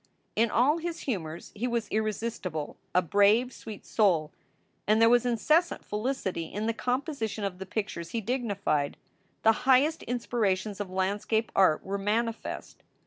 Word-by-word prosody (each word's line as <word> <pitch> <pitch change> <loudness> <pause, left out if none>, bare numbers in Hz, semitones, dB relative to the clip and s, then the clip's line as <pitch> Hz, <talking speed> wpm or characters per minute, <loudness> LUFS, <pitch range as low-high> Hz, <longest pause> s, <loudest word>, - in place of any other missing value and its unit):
In 230 +1 +3
all 280 +9 +3
his 340 0 -4
humors 170 - -4
he 230 +4 -2
was 235 -3 -1
irresistible, 215 -7 -2 0.2
a 180 - +5
brave, 205 +8 +4
sweet 215 -3 -9
soul; 170 -8 +2 0.6
and 215 +1 +4
there 230 0 +6
was 245 0 +4
incessant 305 +9 +2
felicity 210 -6 -2
in 205 +6 -4
the 230 - +1
composition 250 -4 -2
of 190 -2 -3
the 190 - -6
pictures 195 -6 -3
he 230 - -2
dignified. 200 - -1 0.5
The 225 - +7 0.2
highest 285 +5 +5
inspirations 215 -5 -1
of 205 -2 -4
landscape 200 +4 0
art 185 -6 +4
were 200 +1 -2
manifest. 225 +3 -2
215 Hz, 145 wpm, -28 LUFS, 190-240 Hz, 0.6 s, The